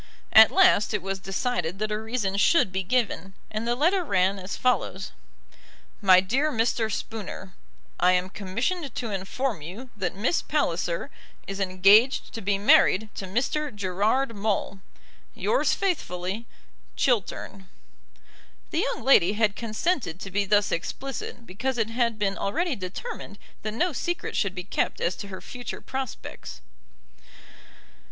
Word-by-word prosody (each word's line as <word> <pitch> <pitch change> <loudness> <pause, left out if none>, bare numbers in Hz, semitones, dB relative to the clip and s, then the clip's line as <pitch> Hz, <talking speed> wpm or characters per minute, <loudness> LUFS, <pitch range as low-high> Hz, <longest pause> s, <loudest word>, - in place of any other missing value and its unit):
At 220 0 +10
last 365 - +4
it 200 - -3
was 195 0 -3
decided 190 -3 -2
that 215 +1 -2
a 210 - -1
reason 220 -4 -2
should 205 - +4
be 190 +1 -1
given, 195 -3 -1 0.2
and 215 +2 -3
the 240 - +2
letter 350 +8 +2
ran 195 - +1
as 185 +1 -6
follows: 240 -6 0 0.9
MY 185 -2 +7
DEAR 265 +11 +1
MR. 225 -2 0
SPOONER, 195 -2 -6 0.5
I 180 +1 +5
am 180 +1 0
commissioned 235 - -3
to 235 -3 -3
inform 200 - -2
you 210 - -9
that 190 -4 -3
Miss 230 - +1
Palliser - - -1 0.3
is 195 0 -5
engaged 195 +6 +4
to 225 - -5
be 200 0 +1
married 205 +1 +4
to 190 - -6
Mr. 270 +9 -1
Gerard 210 +5 0
Maule. 200 -1 -1 0.6
Yours - - +1
faithfully, 215 - -2 0.5
CHILTERN. 200 -5 -1 1.0
The 325 - 0
young 235 - -6
lady 205 -8 +5
had 210 -2 +1
consented 230 - -1
to 195 - -6
be 200 +1 +1
thus 205 +1 +3
explicit 240 +5 -4
because 245 +8 -3
it 225 -1 0
had 235 -2 0
been 200 -2 -1
already 320 - 0
determined 200 - -7 0.2
that 215 - -3
no 350 +7 +1
secret 345 +7 -3
should 200 -2 0
be 180 - -4
kept - - -1
as 170 0 0
to 200 - -7
her 190 -1 -8
future 245 -1 -7
prospects. 265 - -6
210 Hz, 145 wpm, -26 LUFS, 190-250 Hz, 1.0 s, At